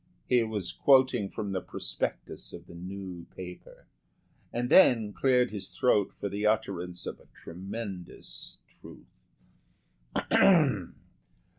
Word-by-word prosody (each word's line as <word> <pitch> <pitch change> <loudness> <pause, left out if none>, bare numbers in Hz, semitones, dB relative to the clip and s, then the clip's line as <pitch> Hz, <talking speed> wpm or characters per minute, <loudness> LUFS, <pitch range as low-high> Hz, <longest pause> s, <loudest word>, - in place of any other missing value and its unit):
He 125 -1 +4
was 110 -5 -2
quoting 130 -6 +4
from 105 -2 -4
the 95 -1 -1
prospectus - - -4
of 85 - -9
the 85 - -13
new 90 0 -7
paper, 90 -1 -10 0.7
and 120 +1 -1
then 115 - +6
cleared 125 +4 +3
his 100 -3 -6
throat 105 -6 +3
for - - -4
the 100 +2 -1
utterance 95 -5 -1
of - - -6
a - - -21
tremendous 95 +1 -7
truth. - - -17
100 Hz, 115 wpm, -29 LUFS, 90-115 Hz, 0.7 s, then